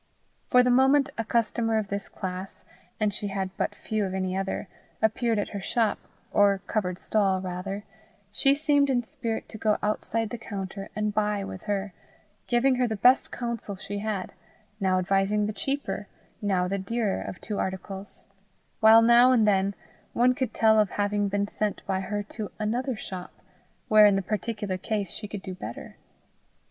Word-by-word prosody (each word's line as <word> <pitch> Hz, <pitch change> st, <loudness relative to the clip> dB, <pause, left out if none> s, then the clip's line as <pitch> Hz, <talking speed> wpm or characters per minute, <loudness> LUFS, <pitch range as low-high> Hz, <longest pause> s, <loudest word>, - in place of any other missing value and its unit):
For 250 Hz, 0 st, +6 dB
the 250 Hz, -, +3 dB
moment 265 Hz, +2 st, +4 dB
a 225 Hz, -, -1 dB
customer 225 Hz, 0 st, +1 dB
of 210 Hz, -2 st, -2 dB
this 200 Hz, 0 st, -4 dB
class, 185 Hz, +1 st, -6 dB, 0.4 s
and 210 Hz, -2 st, +1 dB
she 205 Hz, -, -2 dB
had 195 Hz, -1 st, -3 dB
but -, -, -2 dB
few 215 Hz, -1 st, -2 dB
of 190 Hz, -1 st, -2 dB
any 185 Hz, -1 st, -1 dB
other, 195 Hz, +1 st, -2 dB, 0.3 s
appeared 225 Hz, +1 st, +1 dB
at 205 Hz, -, -1 dB
her 200 Hz, -, -5 dB
shop, 220 Hz, +2 st, +1 dB, 0.3 s
or 200 Hz, -1 st, +4 dB
covered 180 Hz, -5 st, -1 dB
stall, 195 Hz, -3 st, +1 dB
rather, 185 Hz, +2 st, -4 dB, 0.5 s
she 275 Hz, 0 st, +4 dB
seemed 285 Hz, -1 st, +2 dB
in 245 Hz, -2 st, +2 dB
spirit 225 Hz, 0 st, -4 dB
to 220 Hz, -, -9 dB
go 215 Hz, 0 st, +2 dB
outside 215 Hz, +1 st, -1 dB
the 240 Hz, -, -5 dB
counter 195 Hz, -2 st, -6 dB
and 210 Hz, 0 st, -1 dB
buy 210 Hz, -1 st, 0 dB
with 190 Hz, -1 st, -7 dB
her, 200 Hz, -2 st, -2 dB, 0.5 s
giving 255 Hz, +2 st, +3 dB
her 250 Hz, -1 st, +2 dB
the 220 Hz, -, -2 dB
best 250 Hz, +6 st, +4 dB
counsel 235 Hz, -4 st, -4 dB
she 200 Hz, +1 st, -5 dB
had, 205 Hz, -3 st, -3 dB, 0.5 s
now 190 Hz, -2 st, +2 dB
advising 195 Hz, +3 st, +1 dB
the 210 Hz, -, -2 dB
cheaper, 275 Hz, +6 st, -3 dB, 0.3 s
now 190 Hz, -3 st, +1 dB
the 195 Hz, +2 st, -1 dB
dearer 210 Hz, +1 st, -1 dB
of 180 Hz, -, -7 dB
two 210 Hz, -3 st, -4 dB
articles; 190 Hz, +1 st, -5 dB, 0.5 s
while 225 Hz, +1 st, +8 dB
now 240 Hz, +2 st, +7 dB
and 225 Hz, -4 st, +4 dB
then 195 Hz, -1 st, +2 dB, 0.4 s
one 250 Hz, +2 st, +4 dB
could 255 Hz, -3 st, -2 dB
tell 220 Hz, -1 st, +4 dB
of 210 Hz, -2 st, +3 dB
having 205 Hz, 0 st, 0 dB
been 200 Hz, 0 st, 0 dB
sent 210 Hz, 0 st, -3 dB
by 190 Hz, -1 st, 0 dB
her 205 Hz, +2 st, -3 dB
to 210 Hz, 0 st, -6 dB
another 240 Hz, +4 st, -1 dB
shop, 185 Hz, -4 st, -7 dB, 0.6 s
where, 215 Hz, -1 st, +8 dB
in 200 Hz, -, +4 dB
the 195 Hz, -, 0 dB
particular 205 Hz, -2 st, -3 dB
case, 205 Hz, -2 st, -2 dB
she 210 Hz, -, -5 dB
could 200 Hz, -2 st, -7 dB
do 185 Hz, -, -5 dB
better. 115 Hz, -10 st, -8 dB
210 Hz, 175 wpm, -27 LUFS, 195-225 Hz, 0.6 s, while